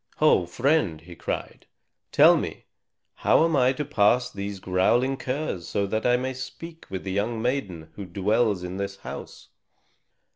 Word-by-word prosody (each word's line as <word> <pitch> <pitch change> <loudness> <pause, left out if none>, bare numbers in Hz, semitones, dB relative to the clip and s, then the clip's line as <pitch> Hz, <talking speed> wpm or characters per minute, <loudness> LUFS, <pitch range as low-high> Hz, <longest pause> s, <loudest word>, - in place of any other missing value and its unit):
"Ho, 90 - +4
friend," 120 - +1
he 85 +1 -12
cried. - - -5 0.4
"Tell - - +7
me, - - -4 0.5
how 160 - +4
am 165 -2 +1
I 130 -1 +4
to 150 +2 -3
pass 125 -3 +2
these 100 0 -5
growling 105 +9 +2
curs 130 - -3
so 100 - 0
that 110 +4 -1
I 125 0 +4
may 130 +1 -3
speak 165 +5 -9
with 95 -1 -5
the 95 - -4
young 110 +4 -1
maiden 100 - -3
who 100 - -7
dwells 100 +2 +1
in 90 +1 -5
this 100 0 -4
house?" - - -8
105 Hz, 160 wpm, -25 LUFS, 95-130 Hz, 0.5 s, Tell